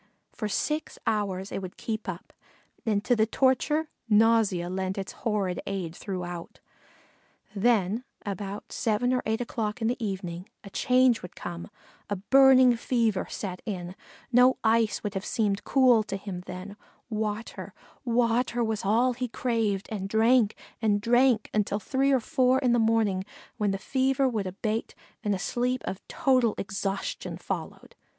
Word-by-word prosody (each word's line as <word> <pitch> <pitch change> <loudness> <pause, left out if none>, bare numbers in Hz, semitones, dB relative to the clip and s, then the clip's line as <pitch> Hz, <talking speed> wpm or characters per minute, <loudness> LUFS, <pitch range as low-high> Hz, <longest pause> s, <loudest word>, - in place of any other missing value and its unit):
For 215 - -3
six 300 +9 -2
hours 200 -3 -1
it - - -3
would 185 -1 -8
keep 220 -3 -4
up, 175 -1 -7 0.5
and 205 -2 +1
to 245 - +3
the 220 -1 +2
torture, 280 +6 +1 0.2
nausea 215 -5 +4
lent 190 +1 -3
its 195 -1 -4
horrid 200 -5 -2
aid 185 -4 -3
throughout; 175 -3 -6 1.0
then 215 +1 +2 0.2
about 200 0 -5
seven 240 +3 +1
or 250 - +1
eight 220 +2 0
o'clock 220 -3 -3
in 225 - 0
the 245 0 -1
evening 185 -3 -4
a 200 - -11
change 255 +1 +3
would 180 - -10
come; 175 +1 -7 0.4
a 205 - 0
burning 260 +4 +6
fever 230 -4 0
set 185 -3 -5
in; 180 -4 -5 0.4
no 250 +1 +5
ice 225 -1 +3
could 205 -2 -4
have 195 -1 -3
seemed 205 -3 0
cool 255 -4 +5
to 195 - -4
him 195 -2 -6
then; 185 +3 -7 0.3
water 215 +1 -3 0.3
water 240 0 +1
was 220 -2 -2
all 235 +6 +3
he 250 +1 -3
craved, 225 -5 -1
and 195 -2 -3
drank 225 0 +4 0.3
and 210 -2 +2
drank 240 0 +3
until 205 -1 +1
three 270 +5 +1
or 265 - +4
four 255 +2 +2
in 255 -3 +2
the 240 - +3
morning, 220 -4 +2 0.3
when 210 -1 +1
the 195 - 0
fever 265 +5 +1
would 215 -6 -1
abate, 215 +4 -3 0.3
and 205 -2 +1
a - - -2
sleep 245 +6 -1
of 190 - -4
total 255 -5 +2
exhaustion 195 -1 -3
followed. - - -6
220 Hz, 155 wpm, -27 LUFS, 195-245 Hz, 1.0 s, burning